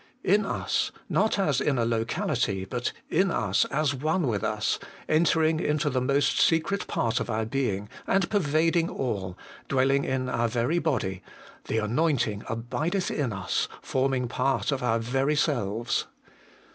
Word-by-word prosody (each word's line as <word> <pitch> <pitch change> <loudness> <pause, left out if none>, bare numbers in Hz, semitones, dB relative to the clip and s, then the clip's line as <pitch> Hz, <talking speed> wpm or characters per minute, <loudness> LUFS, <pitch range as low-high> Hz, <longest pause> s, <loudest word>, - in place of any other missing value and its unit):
In 205 +2 +3
us, - - -1 0.2
not 220 - +2
as 150 -9 +1
in 140 -3 +1
a 115 - +2
locality, 115 -3 -1
but 120 +5 -2 0.2
in 190 +4 +3
us, 105 - +1
as 145 -1 0
one 155 +5 0
with 110 -5 -1
us, 110 0 0 0.3
entering 160 0 +3
into 150 -3 0
the 130 0 0
most 140 +2 +2
secret 165 +5 +2
part 115 -1 0
of - - -4
our 110 +1 0
being, 110 -5 -1 0.2
and 195 -2 +2
pervading 165 -2 +2
all, 95 -8 -3 0.3
dwelling 135 +1 +2
in 130 -1 -1
our 120 -2 +1
very 120 +8 0
body, 105 - -1 0.5
the 110 - -1
anointing 115 -2 +1
abideth 135 - -2
in 140 -6 -1
us, 95 -3 -1 0.2
forming 130 -1 0
part 135 +4 0
of 135 - -1
our 120 -2 +2
very 135 +6 0
selves. 120 -6 0
130 Hz, 150 wpm, -27 LUFS, 115-155 Hz, 0.5 s, In